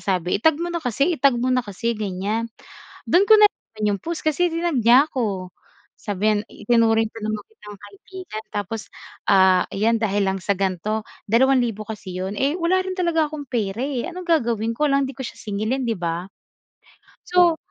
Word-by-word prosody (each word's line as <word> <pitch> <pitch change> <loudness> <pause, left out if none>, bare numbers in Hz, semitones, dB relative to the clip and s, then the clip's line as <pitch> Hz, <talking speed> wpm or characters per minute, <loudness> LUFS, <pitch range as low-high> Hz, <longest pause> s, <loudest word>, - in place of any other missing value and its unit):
sabi 180 -2 0
i-tag 320 +4 +4
mo 345 +1 -3
na 340 - -2
kasi 275 +7 +1
i-tag 275 -4 +3
mo 250 +2 0
na 255 - +3
kasi 215 +1 -3
ganyan 210 +2 -2 0.6
do'n 370 +4 +5
ko 440 - +8
nalaman 410 - +1
'yong 200 -1 +1
post 335 -1 -4
kasi 310 +3 +2
tinag 335 -3 0
niya 245 +5 +6
ako 195 -8 -3 0.5
sabi 205 +1 0
niyan 210 - +1
itinuring 225 0 +2
pa 225 - -9
naman 215 -1 -2
kitang 210 - -13
kaibigan 215 - -9
tapos, 205 +2 -3 0.5
ah, 190 -2 +5
ayan 225 +3 +2
dahil 205 -2 +1
lang 190 0 -1
sa 200 - +1
gan 190 -1 0
'to 215 +5 -2 0.2
dalawang 260 +5 +4
libo 225 -3 -3
kasi 205 -4 -7
'yon, 190 +3 -4
eh, 280 +3 +1
wala 350 +2 +2
rin 375 0 -4
talaga 340 -4 +1
akong 300 -1 -7
pera, 220 -3 -2
eh. 270 0 -2
Anong 360 0 -7
gagawin 235 -9 +1
ko 300 - +2
alangan 275 0 +2
'di 265 - -9
ko - - -3
siya - - -10
singilin 220 +6 -1
'di 230 -2 -1
ba? 170 +1 -3 1.0
So, 355 -2 +4
230 Hz, 190 wpm, -22 LUFS, 205-300 Hz, 1.0 s, ko